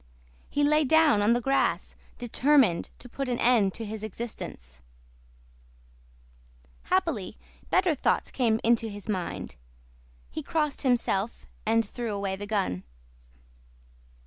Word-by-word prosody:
He 290 - 0
lay 300 +1 +4
down 305 -6 +4
on 210 +3 +4
the 240 - +1
grass 270 +3 +1 0.2
determined 245 - +3
to - - -12
put 270 +2 -4
an 245 - 0
end 225 -6 +3
to 225 - -4
his 215 0 -6
existence; 190 - -7 2.0
happily 60 - 0 0.3
better - - +3
thoughts - - 0
came 225 -4 +1
into 230 -1 +2
his 205 -1 -9
mind; 180 - -4 0.7
he - - -4
crossed 300 -3 -1
himself, 235 -4 0 0.2
and 225 0 +3
threw 235 -1 -4
away 200 -1 -2
the 205 +1 -7
gun. 195 - -1
225 Hz, 120 wpm, -27 LUFS, 205-255 Hz, 2.0 s, lay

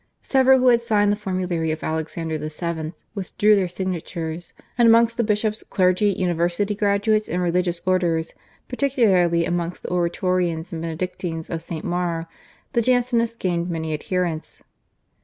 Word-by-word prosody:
Several 265 -1 +5
who 255 0 +4
had 235 -1 +4
signed 210 -3 +2
the - - +2
formulary 185 -5 -2
of 155 0 -3
Alexander 160 0 -3
VII. 160 +1 -4 0.2
withdrew 210 +1 +2
their 190 -2 +1
signatures, 175 -2 -4 0.2
and 235 -1 +4
amongst 230 0 +5
the 235 - +1
bishops, 215 0 0
clergy, 185 +2 +2
university 180 +1 0
graduates, 205 +1 +1
and 180 - -1
religious 175 0 0
orders, 170 -3 +1 0.3
particularly 195 -11 +2
amongst 175 0 -3
the - - -5
Oratorians 175 -1 0
and 165 - -4
Benedictines 165 0 -4
of 165 -1 -3
St. 165 -1 -6
Maur, 175 -2 -1 0.5
the 235 - +3
Jansenists 235 -1 +1
gained 175 -3 -1
many 160 -2 -3
adherents. 170 0 -3
180 Hz, 140 wpm, -22 LUFS, 170-210 Hz, 0.5 s, Several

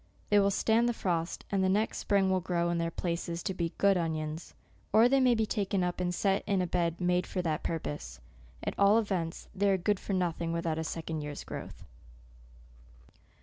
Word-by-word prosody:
They 205 - +6
will 200 0 +4
stand 225 +4 +2
the - - 0
frost, 170 -4 -2
and 195 -1 +2
the 185 - +3
next 210 +3 +1
spring 195 -2 +2
will 185 - +2
grow 170 -1 0
in 170 - 0
their 165 0 0
places 170 0 -3
to 190 - -2
be 170 -2 -2
good 200 -1 +4
onions; 160 -1 -3 0.4
or 225 +2 +6
they 270 +2 +3
may 250 -2 +4
be 220 -1 +1
taken 200 -3 -1
up 180 0 -2
and 180 -1 0
set 195 +2 +1
in 200 -2 +2
a 180 - +1
bed 170 -1 -1
made 180 0 +1
for 180 - -2
that 160 -1 -1
purpose. 145 - -4 0.4
At - - -2
all 200 +2 +6
events, 185 -7 -2
they 200 0 +2
are 195 - +3
good 195 +2 0
for 200 - -4
nothing 170 -2 -1
without 165 -1 -1
a - - -1
second 160 0 -4
year's 145 -1 -6
growth. - - -8
180 Hz, 205 wpm, -30 LUFS, 165-200 Hz, 0.4 s, They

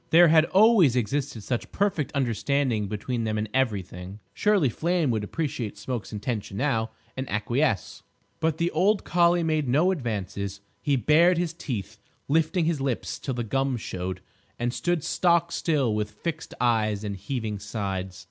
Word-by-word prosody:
There 170 +1 +7
had 160 0 +6
always 190 - +5
existed 125 -1 -1
such 120 +1 -3
perfect 190 -8 0
understanding 130 -3 0
between 115 +4 -3
them 110 -1 -1
in 105 +1 -1
everything. 100 -6 -2
Surely 205 -8 +3
Flame 165 +3 0
would 110 -2 -1
appreciate 120 -4 -3
Smoke's 115 +2 -5
intention 105 -2 -4
now, 115 -4 0 0.3
and 130 0 -4
acquiesce. 115 +2 0 0.4
But 160 -1 0
the 170 +1 0
old 195 +6 +2
collie 175 0 +3
made 155 -3 0
no 155 +9 +3
advances. 100 - -3 0.2
He 145 -2 +2
bared 160 - +4
his 170 -1 -1
teeth, 110 - -5 0.3
lifting 160 +3 +2
his 160 -4 0
lips 135 -4 -2
till 130 - -3
the 120 - -2
gums 135 +1 -1
showed, 90 0 -4 0.4
and 120 +1 -1
stood 175 -1 0
stockstill 170 -7 +1
with 105 -1 -1
fixed 145 +10 -5
eyes 110 -4 +1
and 100 -1 -3
heaving 105 +1 -4
sides. 95 -3 -4
130 Hz, 155 wpm, -26 LUFS, 105-160 Hz, 0.4 s, There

